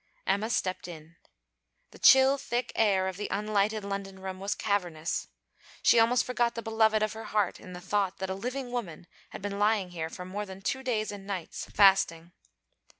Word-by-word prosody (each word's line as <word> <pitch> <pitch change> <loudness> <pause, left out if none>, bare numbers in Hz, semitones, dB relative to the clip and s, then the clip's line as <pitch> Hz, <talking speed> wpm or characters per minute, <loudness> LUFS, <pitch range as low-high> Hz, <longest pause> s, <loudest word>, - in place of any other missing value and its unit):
Emma 200 +3 0
stepped 185 -6 -1
in. 165 -1 -11 0.8
The - - -15
chill 265 +1 +7
thick 245 -1 -2
air 195 -4 +3
of 190 -1 -4
the 205 - -3
unlighted 210 0 0
London 195 -1 -5
room 190 0 -6
was 200 +1 -2
cavernous. 175 -6 -2 0.6
She 235 - +6
almost 235 +2 +4
forgot 240 -1 0
the 230 - -5
beloved 220 -1 +2
of 215 - -1
her 225 0 -8
heart 210 -3 0
in 180 - -11
the 180 - -7
thought 195 +1 -1
that 190 0 -4
a - - 0
living 250 +5 -4
woman 190 -10 -5 0.2
had - - -9
been 200 0 -3
lying 205 -3 +2
here 160 -2 -4 0.2
more 205 +3 -5
than 190 0 -9
two 265 - -1
days 225 -5 -1
and 200 -1 -9
nights, 190 -5 -5
fasting. 185 -4 +4
200 Hz, 185 wpm, -29 LUFS, 190-220 Hz, 0.8 s, chill